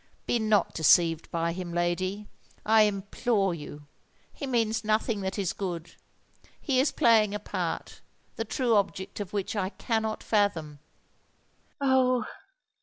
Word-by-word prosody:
be 240 Hz, -, +1 dB
not 215 Hz, -2 st, +2 dB
deceived 165 Hz, 0 st, +3 dB
by 170 Hz, 0 st, -1 dB
him, 180 Hz, -1 st, -6 dB
lady—I 185 Hz, +5 st, -1 dB
implore 200 Hz, 0 st, -1 dB
you: 150 Hz, -2 st, -9 dB, 0.5 s
he 280 Hz, -, -6 dB
means 230 Hz, -4 st, 0 dB
nothing 215 Hz, 0 st, 0 dB
that 190 Hz, +1 st, -3 dB
is 195 Hz, -4 st, -1 dB
good—he 185 Hz, -, -5 dB
is 270 Hz, -, +3 dB
playing 215 Hz, -3 st, +4 dB
a -, -, -2 dB
part, -, -, -4 dB, 0.3 s
the 225 Hz, -, -2 dB
true 235 Hz, +2 st, 0 dB
object 195 Hz, -1 st, -2 dB
of 205 Hz, -2 st, -5 dB
which 205 Hz, +1 st, -3 dB
I 190 Hz, -2 st, -1 dB
cannot 220 Hz, 0 st, -2 dB
fathom!" 170 Hz, -9 st, 0 dB, 1.0 s
"Oh! 260 Hz, -2 st, +3 dB
205 Hz, 125 wpm, -28 LUFS, 180-225 Hz, 1.0 s, playing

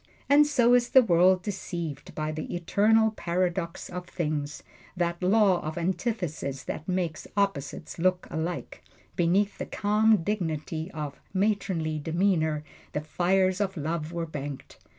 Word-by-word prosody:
And 290 Hz, +1 st, +6 dB
so 245 Hz, -5 st, +4 dB
is 245 Hz, -1 st, +4 dB
the 260 Hz, -, +7 dB
world 180 Hz, -1 st, +4 dB
deceived 170 Hz, -7 st, -5 dB
by 155 Hz, 0 st, -2 dB
the 155 Hz, +2 st, -5 dB
Eternal 215 Hz, +5 st, +3 dB
Paradox 175 Hz, -3 st, -2 dB
of 180 Hz, 0 st, -7 dB
things 150 Hz, -4 st, -3 dB, 0.3 s
that 170 Hz, -1 st, -1 dB
law 195 Hz, -1 st, +4 dB
of 155 Hz, +2 st, -5 dB
antithesis 175 Hz, -, -2 dB
which 155 Hz, -, -5 dB
makes 180 Hz, -4 st, -2 dB
opposites 165 Hz, -6 st, -2 dB
look 180 Hz, +1 st, +2 dB
alike. 170 Hz, +1 st, -4 dB, 0.3 s
Beneath 190 Hz, +4 st, +2 dB
the -, -, -4 dB
calm 210 Hz, -2 st, +3 dB
dignity 160 Hz, -4 st, -2 dB
of 150 Hz, -5 st, -6 dB, 0.2 s
matronly 190 Hz, -6 st, 0 dB
demeanor 160 Hz, -2 st, +1 dB, 0.3 s
the 150 Hz, -, -1 dB
fires 185 Hz, +4 st, +1 dB
of 195 Hz, -2 st, -1 dB
love 155 Hz, +1 st, -3 dB
were 170 Hz, -1 st, -2 dB
banked. 145 Hz, -3 st, -7 dB
175 Hz, 135 wpm, -27 LUFS, 155-200 Hz, 0.3 s, the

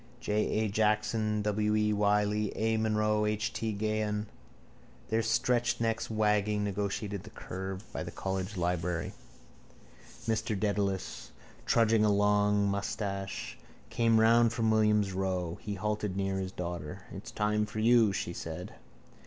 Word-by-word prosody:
J. 105 Hz, -, -3 dB, 0.3 s
A. 110 Hz, -, +1 dB
Jackson, 105 Hz, 0 st, +1 dB
W. 105 Hz, 0 st, +1 dB
E. 105 Hz, 0 st, +2 dB
Wylie, 105 Hz, 0 st, +2 dB
A. 110 Hz, +1 st, +1 dB
Munro 105 Hz, -1 st, +1 dB
and 105 Hz, 0 st, +2 dB
H. 110 Hz, +3 st, -2 dB
T. 110 Hz, -1 st, -2 dB
Gahan, 105 Hz, 0 st, -1 dB, 0.8 s
their 110 Hz, +1 st, +2 dB
stretched 120 Hz, +1 st, +1 dB
necks 115 Hz, -1 st, -1 dB
wagging, 105 Hz, -1 st, +1 dB
negotiated 100 Hz, 0 st, -2 dB
the 110 Hz, -, -11 dB
curve 95 Hz, -1 st, -6 dB
by -, -, -3 dB
the -, -, -5 dB
College 95 Hz, +1 st, -3 dB
library. 85 Hz, -2 st, -1 dB, 1.1 s
Mr 110 Hz, -2 st, -1 dB
Dedalus, 100 Hz, -2 st, -1 dB, 0.4 s
tugging 115 Hz, -1 st, +4 dB
a 105 Hz, -, +4 dB
long 105 Hz, 0 st, +3 dB
moustache, 100 Hz, 0 st, -3 dB, 0.3 s
came 115 Hz, -1 st, +3 dB
round 115 Hz, +1 st, +5 dB
from 115 Hz, -1 st, +1 dB
Williams's 105 Hz, -2 st, +3 dB
row. 90 Hz, -3 st, -2 dB
He 105 Hz, -1 st, -4 dB
halted 105 Hz, -1 st, -2 dB
near 95 Hz, 0 st, -1 dB
his 95 Hz, -1 st, -3 dB
daughter. 85 Hz, -4 st, -5 dB
—It's -, -, -8 dB
time 105 Hz, 0 st, 0 dB
for 105 Hz, -, -8 dB
you, 115 Hz, -1 st, +5 dB
she 85 Hz, -2 st, -3 dB
said. 85 Hz, +2 st, -6 dB
105 Hz, 140 wpm, -30 LUFS, 100-110 Hz, 1.1 s, round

